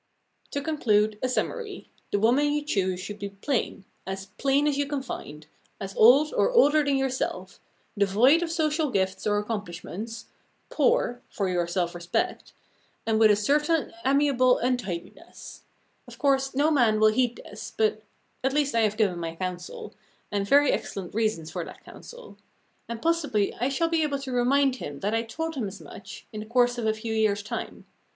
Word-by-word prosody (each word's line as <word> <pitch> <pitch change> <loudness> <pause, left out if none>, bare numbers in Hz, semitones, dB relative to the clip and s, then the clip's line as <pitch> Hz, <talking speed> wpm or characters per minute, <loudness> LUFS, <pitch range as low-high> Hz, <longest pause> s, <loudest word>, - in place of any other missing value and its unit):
To 285 - -3
conclude, 215 -9 +1
a 255 - 0
summary. 415 - -3 0.2
The - - +2
woman 255 +8 +3
you 295 0 -1
choose 190 -9 -1
should 205 +2 -7
be 200 - -4
plain, 200 -1 -3 0.2
as 190 0 -4
plain 275 +2 +2
as 295 -2 +2
you 285 0 0
can 285 -2 -3
find, 150 - -8 0.3
as 195 0 -6
old 275 +7 +6
or - - +3
older 310 -11 +5
than 280 -1 +1
yourself, 265 -1 -3 0.4
devoid 220 - +4
of 345 - -2
social 315 -2 0
gifts 190 -3 -1
or 205 0 +2
accomplishments, 210 +1 -5 0.5
poor 470 - +1
for 195 -2 -2
your 175 -1 0
self 175 0 -1
respect 175 0 -2 0.5
and 220 -1 +1
with 220 -1 +6
a 210 - +6
certain 295 +9 +1
amiable 270 -2 +3
untidiness. 230 -9 -5 0.4
Of - - -12
course 270 -2 +1
no 285 +2 +2
young 315 - +3
man 230 -6 +3
will 215 0 +6
heed 245 0 +1
this, - - -9
but 435 0 +1 0.4
at 265 +1 +1
least 290 -1 +1
I 230 - +2
have 215 -1 +1
given 195 -6 +1
my 165 -1 -4
counsel, 180 0 -6 0.4
and 200 -1 -1
very 285 0 +5
excellent 190 -3 -4
reasons 215 -8 -1
for - - -3
that - - -12
counsel. 485 -1 -13 0.5
And 230 -1 -6
possibly 295 -12 +1
I 250 +3 -1
shall 305 +5 +1
be 330 -1 +1
able 295 -2 0
to 270 -1 -6
remind 260 +2 +2
him 145 - -7
that 205 +2 -1
I 225 - +2
told 320 +8 -4
him 250 -8 -3
as 195 0 -9
much, 165 +5 -11
in 215 - -5
the 215 - -7
course 245 +1 +2
of 225 - -1
a 220 - +3
few 220 +1 -4
years' 210 -2 +1
time. 205 - -6
235 Hz, 185 wpm, -26 LUFS, 205-285 Hz, 0.5 s, old